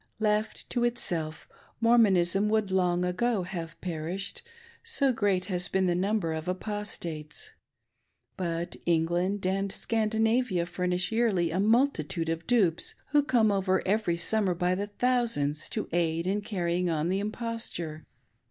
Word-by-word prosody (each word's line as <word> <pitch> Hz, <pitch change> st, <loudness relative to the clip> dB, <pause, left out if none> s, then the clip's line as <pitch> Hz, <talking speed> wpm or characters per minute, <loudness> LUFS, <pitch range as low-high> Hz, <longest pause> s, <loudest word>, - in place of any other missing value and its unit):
Left 215 Hz, 0 st, 0 dB
to 240 Hz, -, 0 dB
itself, 165 Hz, -10 st, -2 dB, 0.3 s
Mormonism 210 Hz, -4 st, +4 dB
would 215 Hz, -3 st, +1 dB
long 180 Hz, -1 st, +2 dB
ago 195 Hz, +3 st, 0 dB
haVe 170 Hz, -2 st, -6 dB
perished, 175 Hz, +3 st, -4 dB, 0.4 s
so 295 Hz, -, +2 dB
great 200 Hz, -5 st, +1 dB
has 180 Hz, -3 st, +1 dB
been 190 Hz, 0 st, +1 dB
the 175 Hz, -, +2 dB
number 190 Hz, -2 st, 0 dB
of 160 Hz, +1 st, -5 dB
Apostates. 180 Hz, -6 st, -4 dB, 0.8 s
But 170 Hz, -1 st, -3 dB
England 175 Hz, +4 st, +1 dB
and 195 Hz, +1 st, 0 dB
Sean'dinavia 220 Hz, -3 st, +1 dB
furnish 180 Hz, +1 st, 0 dB
yearly 210 Hz, -8 st, +1 dB
a 180 Hz, -, -1 dB
multitude 200 Hz, -, +1 dB
of 165 Hz, +1 st, -3 dB
dupes, 195 Hz, -9 st, +2 dB
who 295 Hz, 0 st, +4 dB
come 240 Hz, -6 st, +3 dB
over 190 Hz, -1 st, +1 dB
every 200 Hz, -4 st, +1 dB
summer 190 Hz, +1 st, +2 dB
by 180 Hz, +1 st, +1 dB
thousands 205 Hz, -, 0 dB
to -, -, -3 dB
aid 165 Hz, -1 st, 0 dB
in 200 Hz, +3 st, 0 dB
carrying 180 Hz, -4 st, -1 dB
on 160 Hz, 0 st, 0 dB
the 190 Hz, +1 st, +1 dB
imposture. 210 Hz, -7 st, -4 dB
190 Hz, 135 wpm, -28 LUFS, 170-220 Hz, 0.8 s, Mormonism